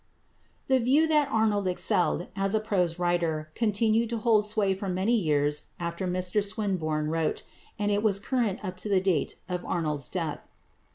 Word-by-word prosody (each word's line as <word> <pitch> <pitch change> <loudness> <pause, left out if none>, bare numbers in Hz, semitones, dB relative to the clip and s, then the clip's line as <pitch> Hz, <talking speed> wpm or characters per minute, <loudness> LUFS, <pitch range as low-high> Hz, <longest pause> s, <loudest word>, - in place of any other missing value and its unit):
The 265 -1 +3
view 275 +7 +3
that 300 -3 +3
Arnold 210 -3 +1
excelled 180 -1 +1
as 195 +1 +1
a - - +3
prose 180 -6 0
writer 170 -3 -1
continued 225 +1 +1
to 235 - -2
hold 215 -2 +3
sway 210 -2 +1
for 190 +1 -5
many 190 +6 +1
years 150 -6 +1
after 170 +2 -3
Mr 180 +3 0
Swinburne 165 -7 -2
wrote, 165 -1 -1 0.3
and 205 0 0
it 205 0 +1
was 210 -3 +2
current 210 -2 -1
up 185 -1 -5
to 195 +3 -3
the 195 -2 +4
date 185 -6 0
of 180 -1 -3
Arnold's 150 -6 -2
death. 165 -5 -3
190 Hz, 170 wpm, -27 LUFS, 170-215 Hz, 0.3 s, the